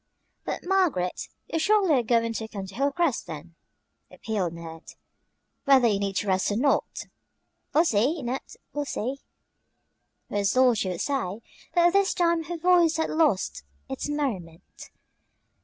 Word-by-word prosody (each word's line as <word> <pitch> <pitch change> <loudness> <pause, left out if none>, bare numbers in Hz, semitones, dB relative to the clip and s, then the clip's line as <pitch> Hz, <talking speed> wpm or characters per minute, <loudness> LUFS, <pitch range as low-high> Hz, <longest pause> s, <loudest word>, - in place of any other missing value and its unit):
"But, - - -4
Margaret, 350 - 0 0.2
you 325 - -2
surely 395 -1 +3
are 260 - +4
going 230 0 +1
to 220 0 -4
come 200 -3 -6
to 190 - -11
Hilcrest 280 - 0
then," 165 +2 -8 0.6
appealed 195 -7 -3
Ned, 165 -1 -10 0.7
"whether 265 -3 +6
you 205 -3 +1
need 195 -1 -1
rest 190 -2 +1
or 205 - -1
not!" 275 +5 0 0.7
"We'll 320 +3 +4
see, 270 +5 +1
Ned, 250 +3 -2 0.3
we'll 290 0 -2
see," 260 0 -3 1.1
was 205 +3 0
all 255 -1 +6
she 205 -4 -1
would 180 -2 -3
say, 230 -7 -2 0.3
but 345 0 +5
this 395 +1 +2
time 340 -2 +1
her 345 +2 -4
voice 340 -1 +4
had 320 - -1
lost 310 - +1 0.3
its 135 - -4
merriment. 200 - -5
250 Hz, 145 wpm, -26 LUFS, 195-320 Hz, 1.1 s, whether